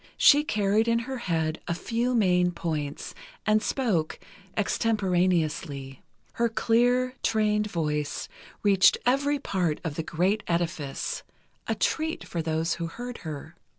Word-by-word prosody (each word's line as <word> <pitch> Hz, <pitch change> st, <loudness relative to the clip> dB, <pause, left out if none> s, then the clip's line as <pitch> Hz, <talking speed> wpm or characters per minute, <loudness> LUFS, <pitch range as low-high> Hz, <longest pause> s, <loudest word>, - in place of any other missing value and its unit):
She 295 Hz, +1 st, +7 dB
carried 215 Hz, -3 st, +1 dB
in 230 Hz, 0 st, +3 dB
her 255 Hz, +2 st, -4 dB
head 160 Hz, -1 st, 0 dB
a 170 Hz, -, 0 dB
few 235 Hz, +6 st, -1 dB
main 180 Hz, -5 st, +3 dB
points, 150 Hz, -4 st, -4 dB, 0.3 s
and 215 Hz, 0 st, +3 dB
spoke 210 Hz, -, 0 dB, 0.4 s
extemporaneously. 175 Hz, -, 0 dB, 0.3 s
Her 235 Hz, 0 st, +1 dB
clear, 245 Hz, +3 st, +2 dB
trained 210 Hz, -1 st, +1 dB
voice, 150 Hz, -4 st, -2 dB, 0.4 s
reached 195 Hz, -2 st, +5 dB
every 280 Hz, +3 st, +2 dB
part 180 Hz, -, -1 dB
of 165 Hz, -4 st, -3 dB
the -, -, 0 dB
great 185 Hz, +7 st, +1 dB
edifice—a 170 Hz, -5 st, -4 dB
treat 320 Hz, +1 st, -1 dB
for 170 Hz, -, -2 dB
those 160 Hz, +1 st, 0 dB
who 170 Hz, -1 st, -3 dB
heard 245 Hz, +7 st, -7 dB
her. 155 Hz, 0 st, -7 dB
190 Hz, 125 wpm, -27 LUFS, 165-230 Hz, 0.4 s, She